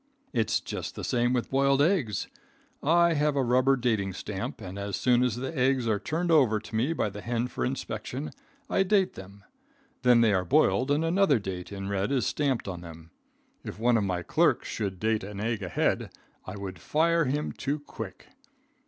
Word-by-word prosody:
"It's 110 -4 +1
just - - -6
the - - -6
same 120 0 +1
with 125 -2 -1
boiled 135 0 +3
eggs. 145 - +1 0.5
I 170 +2 +4
have 150 -1 +1
a 135 - +2
rubber 130 +2 +3
dating 110 -7 0
stamp, 95 +1 -5
and 95 +2 -7
as 100 0 -3
soon 125 -1 +3
as 125 -4 +1
the 130 +6 -5
eggs 130 -2 +2
are 105 -2 +1
turned 170 - -1
over 130 -9 +4
to 110 - -9
me 125 +8 +1
by 110 -10 -1
the 105 +1 -8
hen 120 +2 -1
for - - -4
inspection, 130 +2 -4 0.4
I - - +1
date 195 0 +2
them. 100 +1 -12 0.6
Then 125 -2 +5
they 110 -3 +4
are 95 -2 +2
boiled 130 - +3
and 145 +3 +2
another 170 -4 +3
date 95 -3 -6
in 95 -1 -5
red 100 +3 -1
is 130 -4 +1
stamped 135 -7 0
on 90 -3 -5
them. 80 -1 -12 0.5
If - - -7
one 120 +2 +3
of 110 - +2
my 90 -2 -2
clerks - - +2
should 95 -3 -3
date 110 -1 0
an 100 0 -7
egg 110 0 -1
ahead, 90 -3 0 0.4
I 95 - -6
would 95 -3 -7
fire 165 +1 +2
him 145 +3 -1
too 145 +2 -2
quick. 115 -9 -9
120 Hz, 195 wpm, -28 LUFS, 100-140 Hz, 0.6 s, Then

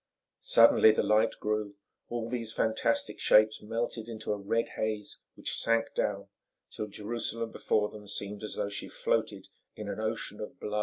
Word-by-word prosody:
Suddenly 115 -1 +6
the - - +1
light 105 +1 +3
grew, 105 -1 -2 0.3
all 120 -1 -3
these 115 -2 -3
fantastic 110 +1 +1
shapes 110 0 +5
melted 115 +1 -3
into 110 -2 -3
a - - -3
red 115 +4 0
haze, 110 -1 -3 0.2
which - - -3
sank 115 0 +1
down - - -1 0.4
till 110 - -4
Jerusalem 115 +2 -3
before 105 -1 +1
them 105 -1 -11
seemed 100 0 -3
as 110 - -5
though 100 - -1
she 100 - -4
floated - - -1 0.3
in 105 -1 -7
an 100 - -4
ocean 110 -1 -3
of 105 - -7
blood - - -18
and 105 - -3
fire. 105 - 0
110 Hz, 175 wpm, -30 LUFS, 105-115 Hz, 0.4 s, Suddenly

